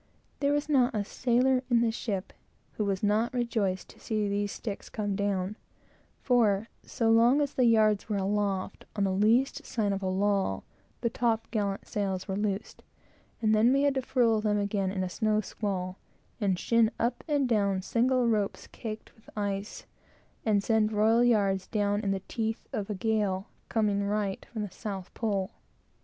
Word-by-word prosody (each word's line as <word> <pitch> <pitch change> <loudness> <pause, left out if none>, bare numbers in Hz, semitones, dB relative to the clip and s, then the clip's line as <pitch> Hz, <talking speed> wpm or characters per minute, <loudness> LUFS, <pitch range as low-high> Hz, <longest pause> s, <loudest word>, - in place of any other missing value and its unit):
There 280 0 +2
was 290 0 0
not 265 -4 +3
a 205 -1 -1
sailor 250 +3 +2
in 235 -2 +4
the 230 -1 +2
ship 200 -4 -4 0.4
who 210 - -2
was 195 -1 -1
not 215 +4 +1
rejoiced 215 -6 -1
to - - -16
see 215 -2 -1
these 200 0 -1
sticks 210 -3 -6
come 205 -2 -2
down; 200 0 -1 0.7
for, 225 -4 +2
so 225 -1 0
long 235 +5 +5
as 285 -2 0
the 255 - +2
yards 215 -2 +3
were 210 - 0
aloft, 200 -1 -1
on 200 - 0
the 195 - +1
least 225 +8 +2
sign 210 -3 -1
of 195 - -3
a 190 - -2
lull, 195 - 0 0.4
the 235 - +1
top 225 -1 0
gallant 200 -3 -2
sails 195 -3 -2
were 190 - -2
loosed, 205 0 -3 0.6
and 215 0 +4
then 220 +3 +5
we 275 +1 +3
had 285 -1 +3
to 265 - 0
furl 235 -4 +2
them 210 -1 +1
again 200 -2 0
in 190 -1 -2
a - - -1
snow 215 +3 +1
squall, 190 -3 -3 0.4
and 195 -4 +1
shin 230 +3 +3
up 240 +1 -1
and 290 -3 +2
down 200 -5 +1
single 250 +3 +2
ropes 210 -3 0
caked 220 -2 -7
with 220 - -20
ice, 200 0 -3 0.6
and 205 -3 +2
send 220 -1 +2
royal 220 +3 +4
yards 200 -5 +2
down 205 -1 0
in 200 - -2
the 195 -1 -1
teeth 225 -1 -3
of 200 -1 -3
a 210 - -2
gale 205 -2 0 0.2
coming 210 -3 +1
right 200 -1 -2
from 220 -3 -3
the 205 - -6
south 195 -4 -6
pole. 200 -3 -1
210 Hz, 180 wpm, -29 LUFS, 200-230 Hz, 0.7 s, long